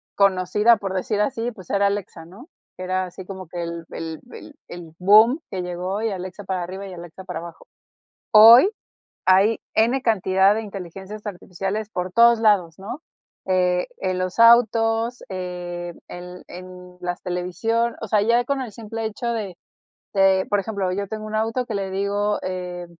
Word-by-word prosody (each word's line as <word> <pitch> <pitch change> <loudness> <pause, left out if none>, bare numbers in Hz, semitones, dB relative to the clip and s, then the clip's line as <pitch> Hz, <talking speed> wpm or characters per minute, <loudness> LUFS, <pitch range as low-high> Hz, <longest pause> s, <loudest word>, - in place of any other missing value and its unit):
conocida, 200 +3 +3
por 195 -2 -4
decir 205 +3 -1
así, 235 +1 -1
pues, 185 -6 -14
era 200 0 +2
Alexa, 200 -5 -4
¿no? 210 - -14 0.3
Era 185 0 -2
así 180 +1 -10
como 190 -1 -8
que 175 -1 -5
el 170 0 -5
el 160 -1 -6
el 295 - -11
el 170 -2 -10
bum 215 - +6
que 185 - -3
llegó 180 +3 -3
y 225 -2 -1
Alexa 185 +1 -7
para 185 -2 -2
arriba 190 +3 -7
y 185 - -9
Alexa 175 +2 -10
para 160 - -5
abajo. 170 -1 -11 0.7
Hoy 230 - +9 0.6
hay 195 +4 +4 0.2
N 240 +4 +3
cantidad 195 -3 +3
de 220 - -2
inteligencias 195 +1 -8
artificiales 195 +3 -4
por 180 -2 -4
todos 235 0 +6
lados, 190 -7 +2
¿no? 235 +10 -7 0.4
Eh, 180 -1 +1
en 185 -1 -2
los 185 +4 -3
autos, 230 0 +4
eh, 175 -2 -5
el 180 0 -9
en 180 0 -11
las 175 0 -4
televisión, 225 +6 -1
o 225 - -4
sea, 210 0 +2
ya 235 +2 +2
con 280 -1 -1
el 240 -4 -6
simple 225 +1 -6
hecho 220 +2 -4
de 200 -6 -4 0.6
de, 190 -1 +4
por 205 -1 +2
ejemplo, 200 -3 -3
yo 200 +1 -3
tengo 215 -1 -5
un 215 0 -5
auto 225 +3 -1
que 225 - -5
le 195 -1 -3
digo, 200 +2 -1
e 180 -1 -5
195 Hz, 170 wpm, -22 LUFS, 180-220 Hz, 0.7 s, Hoy